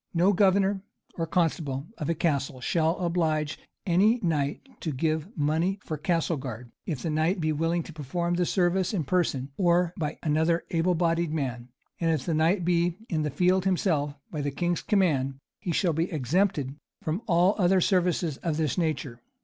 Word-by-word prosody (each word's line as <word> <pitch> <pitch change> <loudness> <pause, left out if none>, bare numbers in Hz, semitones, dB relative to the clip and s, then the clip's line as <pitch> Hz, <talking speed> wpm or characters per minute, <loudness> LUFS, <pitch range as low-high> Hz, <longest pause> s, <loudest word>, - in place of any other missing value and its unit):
No 180 +4 +4
governor 195 0 +3 0.3
or 165 -1 -3
constable 155 -5 0
of 150 - -2
a 165 - +1
castle 140 -5 0
shall 160 +5 +1
oblige 160 -4 0 0.3
any 200 +7 +4
knight 150 - -1
to 160 - -3
give 155 +3 -1
money 160 +6 +1
for 155 - -3
castle 165 +1 0
guard, 125 -3 -7 0.2
if 150 -7 -3
the 165 - -1
knight 160 +5 +1
be 155 -1 +1
willing 165 +3 0
to 165 - -10
perform 170 +4 -2
the 175 0 +1
service 185 +2 +1
in 170 - 0
person, 140 -4 0
or 175 -2 +3
by 150 -1 -2
another 160 +2 +2
able 175 +2 +2
bodied 165 -1 +1
man; 125 -6 -3 0.3
and 165 - +1
if 155 -5 0
the 170 - 0
knight 165 +4 +2
be 175 0 +2
in 160 -4 0
the 150 - 0
field 180 +6 +2
himself, 165 -6 +1 0.2
by 150 - -3
the 145 - -1
king's 175 +5 -1
command, 150 - +1 0.2
he 175 - -3
shall 170 0 +2
be 165 +4 -1
exempted 150 -1 0 0.3
from 160 +6 -1
all 180 +1 +4
other 185 0 +4
service 180 -1 +2
of 155 0 -2
this 160 +2 0
nature. 150 -7 -2
165 Hz, 180 wpm, -27 LUFS, 150-180 Hz, 0.3 s, No